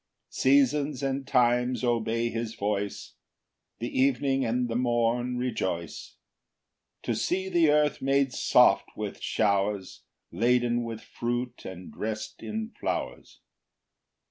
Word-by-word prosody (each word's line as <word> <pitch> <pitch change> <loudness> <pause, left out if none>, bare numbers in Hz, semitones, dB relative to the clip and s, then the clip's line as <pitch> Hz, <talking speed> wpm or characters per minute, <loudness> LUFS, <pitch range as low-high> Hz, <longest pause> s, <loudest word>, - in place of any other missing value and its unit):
8 - - -26
Seasons 140 +1 +2
and 135 0 -2
times 125 -1 +2
obey 115 -1 0
his 115 0 -4
voice; 100 -1 -3 0.6
The 120 +2 -3
evening 135 0 +2
and 120 +1 0
the 115 - -3
morn 120 0 +1
rejoice 95 -10 -3 0.9
To - - -1
see 190 +1 -1
the 170 -4 +4
earth 150 0 +2
made 135 -1 +2
soft - - +4
with - - -5
showers, 100 -2 0 0.3
Laden 120 +4 +2
with 115 -1 -6
fruit 120 +1 -4
and 90 -1 -8
drest 110 0 -5
in 220 +1 -4
flowers. - - -4
120 Hz, 115 wpm, -27 LUFS, 115-135 Hz, 0.9 s, the